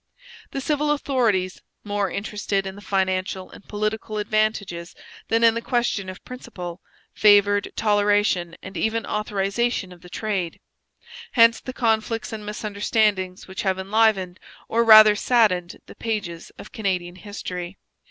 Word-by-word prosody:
The 275 Hz, -, -4 dB
civil 300 Hz, +2 st, 0 dB
authorities, 235 Hz, -11 st, 0 dB, 0.2 s
more 205 Hz, -1 st, -1 dB
interested 200 Hz, -1 st, -2 dB
in 190 Hz, -, -5 dB
the 200 Hz, -, -12 dB
financial 190 Hz, -1 st, -1 dB
and -, -, -13 dB
political 215 Hz, +1 st, -3 dB
advantages 210 Hz, -5 st, -1 dB, 0.3 s
than 230 Hz, +1 st, +1 dB
in 230 Hz, -1 st, +6 dB
the 230 Hz, -, -3 dB
question 235 Hz, -6 st, -1 dB
of 185 Hz, -, -10 dB
principle, 180 Hz, -8 st, -8 dB, 0.3 s
favoured 205 Hz, -1 st, +4 dB
toleration 205 Hz, -5 st, +2 dB
and 190 Hz, +1 st, -9 dB
even 220 Hz, +3 st, -1 dB
authorization 210 Hz, 0 st, -1 dB
of 175 Hz, -1 st, -14 dB
the 180 Hz, -, -13 dB
trade. 195 Hz, -5 st, -3 dB, 0.7 s
Hence 230 Hz, -2 st, +6 dB
the 255 Hz, -, -7 dB
conflicts 225 Hz, -2 st, -1 dB
and 215 Hz, -1 st, -6 dB
misunderstandings 210 Hz, -2 st, -1 dB
which 190 Hz, 0 st, -5 dB
have 190 Hz, -2 st, 0 dB
enlivened, 195 Hz, -2 st, +1 dB, 0.3 s
or 230 Hz, +1 st, +2 dB
rather 215 Hz, -2 st, +9 dB
saddened, 205 Hz, -7 st, +2 dB
the -, -, -12 dB
pages 205 Hz, -7 st, -4 dB
of -, -, -11 dB
Canadian 180 Hz, -4 st, -2 dB
history. 185 Hz, -2 st, -6 dB
205 Hz, 135 wpm, -23 LUFS, 185-220 Hz, 0.7 s, rather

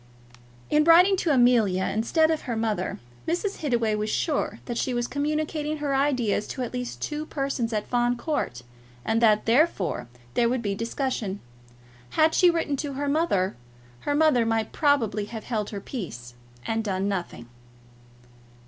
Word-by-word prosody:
In 300 Hz, 0 st, +5 dB
writing 350 Hz, +4 st, +7 dB
to 355 Hz, -, -1 dB
Amelia 240 Hz, -8 st, +4 dB
instead 315 Hz, -, +2 dB
of 315 Hz, -, 0 dB
to -, -, -15 dB
her 240 Hz, -4 st, -2 dB
mother, 220 Hz, -4 st, -1 dB, 0.3 s
Mrs. 360 Hz, +5 st, -1 dB
Hittaway 235 Hz, -7 st, 0 dB
was 210 Hz, 0 st, -1 dB
sure 300 Hz, +6 st, -1 dB
that 240 Hz, -2 st, -3 dB
she 255 Hz, -, -1 dB
was 240 Hz, 0 st, -1 dB
communicating 305 Hz, +1 st, -2 dB
her 290 Hz, -2 st, -2 dB
ideas 255 Hz, -7 st, +1 dB
to 260 Hz, -, -4 dB
at 245 Hz, -, -5 dB
least 250 Hz, -1 st, -5 dB
two 305 Hz, +1 st, -3 dB
persons 275 Hz, -5 st, -2 dB
at 210 Hz, -1 st, -1 dB
Fawn 245 Hz, 0 st, +1 dB
Court, 235 Hz, -, -3 dB, 0.4 s
and 225 Hz, +1 st, +1 dB
that 215 Hz, -2 st, +4 dB
therefore 230 Hz, -, +1 dB, 0.3 s
there 235 Hz, -1 st, +2 dB
would 250 Hz, -1 st, -1 dB
be 200 Hz, -2 st, -1 dB
discussion. 230 Hz, -2 st, -3 dB, 0.8 s
Had 315 Hz, +1 st, +5 dB
she 360 Hz, -, +5 dB
written 330 Hz, -4 st, 0 dB
to 280 Hz, 0 st, -4 dB
her 285 Hz, +2 st, -3 dB
mother, 280 Hz, -, +1 dB, 0.4 s
her 290 Hz, -, -1 dB
mother 300 Hz, -6 st, +4 dB
might 225 Hz, -1 st, 0 dB
probably 230 Hz, -9 st, +1 dB
have 220 Hz, 0 st, -7 dB
held 215 Hz, -4 st, -2 dB
her 205 Hz, -, -5 dB
peace, 140 Hz, -, -7 dB, 0.3 s
and 225 Hz, 0 st, -1 dB
done 195 Hz, -2 st, -1 dB
nothing. 180 Hz, -11 st, -4 dB
245 Hz, 165 wpm, -26 LUFS, 215-295 Hz, 0.8 s, writing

